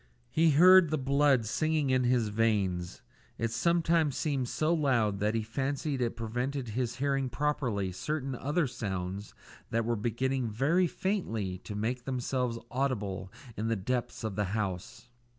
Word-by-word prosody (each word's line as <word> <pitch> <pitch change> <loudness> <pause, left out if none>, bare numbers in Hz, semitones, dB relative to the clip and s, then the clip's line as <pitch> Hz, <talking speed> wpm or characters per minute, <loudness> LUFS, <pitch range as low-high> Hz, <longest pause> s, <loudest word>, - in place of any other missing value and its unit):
He 160 +1 +4
heard 180 +3 +7
the 155 - 0
blood 140 -2 +3
singing 155 +3 0
in 130 -1 +2
his 120 -3 +2
veins. 100 -5 0 0.3
It 115 0 -1
sometimes 165 +2 +2
seemed 135 -5 -1
so 155 +2 +1
loud 120 -10 +1
that 105 +2 +1
he 110 - 0
fancied 135 +4 -2
it 120 -1 0
prevented 125 +3 -3
his 120 +2 -2
hearing 135 0 0
properly 120 -7 -1
certain 135 +7 -3
other 145 +6 0
sounds 100 -5 -4 0.3
that 115 0 0
were 120 0 +1
beginning 120 +3 -1
very 150 - +2
faintly 115 - -2
to 105 - -8
make 120 +4 -2
themselves 125 -2 -1
audible 105 -8 -2 0.2
in 110 - -2
the 115 - +1
depths 120 +6 -3
of 110 -3 -3
the 105 0 0
house. 105 +3 -4
125 Hz, 150 wpm, -30 LUFS, 110-140 Hz, 0.3 s, heard